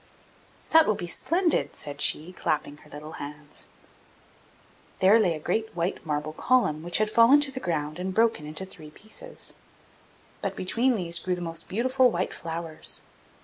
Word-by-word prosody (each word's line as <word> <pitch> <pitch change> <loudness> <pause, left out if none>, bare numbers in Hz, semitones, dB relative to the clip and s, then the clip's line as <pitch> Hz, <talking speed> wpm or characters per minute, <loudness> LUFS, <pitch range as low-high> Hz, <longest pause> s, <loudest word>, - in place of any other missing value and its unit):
'That 320 0 +7
will 215 - +2
be 175 - -5
splendid!' 335 - +1
said 145 -1 -6
she, 165 +5 +3
clapping 150 -3 -2
her - - -19
little 150 +1 -9
hands. 150 +1 -7 1.3
There 200 +4 +6
lay 180 -7 +2
a - - -6
great 220 +7 -2
white 170 +2 -2
marble 150 -1 -3
column 160 -7 +2
which 175 +1 +1
had 215 - +2
fallen 230 +6 +6
to 285 -2 +3
the 260 - -5
ground 155 -5 -3
and 185 +1 -2
broken 220 -7 +1
into 155 +5 -3
three 155 -5 -11
pieces, 220 - -5 0.9
but - - -3
between 235 +7 +1
these 170 -4 +2
grew 180 +1 -1
the - - -7
most 165 -1 -4
beautiful 255 +4 +3
white 185 -4 -2
flowers. 165 -1 -2
180 Hz, 165 wpm, -26 LUFS, 155-230 Hz, 1.3 s, That